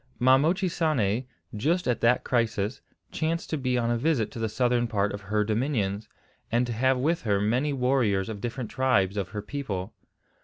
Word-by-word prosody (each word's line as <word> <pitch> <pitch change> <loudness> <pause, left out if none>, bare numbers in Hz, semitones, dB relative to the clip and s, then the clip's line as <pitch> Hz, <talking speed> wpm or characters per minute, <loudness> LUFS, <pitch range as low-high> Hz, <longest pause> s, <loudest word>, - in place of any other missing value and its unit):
Ma 130 +1 +5
Mochisane, 155 - +1 0.3
just 165 - 0
at 125 - 0
that 120 +2 +3
crisis, 110 -2 0 0.3
chanced 165 +1 -2
to - - +1
be 130 -3 0
on 120 -1 +1
a 120 - 0
visit 135 -6 +1
to - - -7
the 110 -1 -1
southern 120 +2 +1
part 105 -2 0
of 100 - -6
her 105 +2 0
dominions, 110 -2 -1 0.4
and 120 +2 +2
to 120 - -3
have 130 +3 +2
with 165 +6 0
her 100 -3 +1
many 125 +8 +1
warriors 125 -7 +1
of 105 -3 -6
different 120 -1 -4
tribes 120 -7 +2
of 100 -3 -2
her 105 -1 -5
people. 105 -8 -4
120 Hz, 185 wpm, -27 LUFS, 105-135 Hz, 0.4 s, Ma